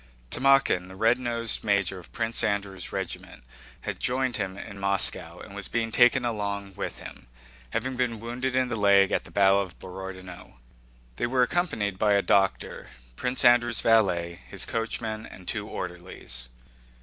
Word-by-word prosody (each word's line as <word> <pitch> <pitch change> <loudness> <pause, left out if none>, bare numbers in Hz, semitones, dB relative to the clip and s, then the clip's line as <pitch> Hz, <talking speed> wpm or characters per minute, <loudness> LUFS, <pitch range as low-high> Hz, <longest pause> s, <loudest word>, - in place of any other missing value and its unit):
Timókhin, 135 -9 +3
the 95 - -11
red 115 +5 +3
nosed 115 -2 0
major 100 -3 +1
of 85 - -15
Prince 115 0 0
Andrew's 100 -3 -2
regiment, - - -6 0.4
had - - -4
joined 130 0 0
him 95 -2 -3
in 100 0 -8
Moscow 100 -1 +1
and - - -11
was - - -4
being 115 -1 -1
taken 125 +1 +5
along 100 -3 -3
with - - -5
him, - - -11 0.4
having 130 +3 -2
been 120 -3 -1
wounded 125 +3 -3
in 130 0 +2
the 120 - -1
leg 100 -2 +5
at - - 0
the - - -10
battle 100 0 +4
of 95 -3 -7
Borodinó. 95 -1 -9 0.6
They - - 0
were 125 +1 +3
accompanied 110 - -1
by 105 -1 +4
a 100 - +3
doctor, 95 +1 +1 0.3
Prince 125 - +1
Andrew's 120 -1 +5
valet, 90 -6 +2
his 95 -1 0
coachman, 110 -1 -3
and 90 -1 -13
two - - -2
orderlies. - - -6
105 Hz, 160 wpm, -27 LUFS, 95-120 Hz, 0.6 s, taken